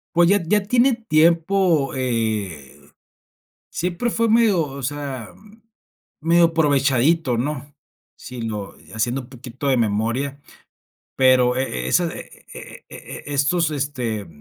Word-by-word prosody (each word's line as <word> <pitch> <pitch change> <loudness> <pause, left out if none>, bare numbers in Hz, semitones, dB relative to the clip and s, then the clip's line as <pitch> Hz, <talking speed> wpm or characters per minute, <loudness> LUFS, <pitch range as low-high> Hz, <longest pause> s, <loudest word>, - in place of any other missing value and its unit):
Pues, 170 0 +5
ya 200 0 +3
ya 205 +5 +1
tiene 245 +5 +3
tiempo, 170 -4 +2
eh, 110 - -3 0.9
siempre 180 +7 -2
fue 230 0 0
medio, 220 -4 +4
o 140 -1 -8
sea 135 -3 -5 0.9
medio 170 +2 +4
aprovechadito, 145 -3 +2
¿no? 145 +2 -4 0.4
Si 125 -1 -9
lo 105 -3 -5 0.2
haciendo 120 +4 -1
un 125 - -15
poquito 130 +2 -7
de 130 - +3
memoria, 115 +6 -1 0.7
pero, 130 -1 +4
eh, 65 - -2
esa 65 - +2
e - - -12
e - - -11
e - - -10
e 145 - -5
estos, 155 +4 +1
este, 125 - -3
140 Hz, 125 wpm, -21 LUFS, 120-170 Hz, 0.9 s, Pues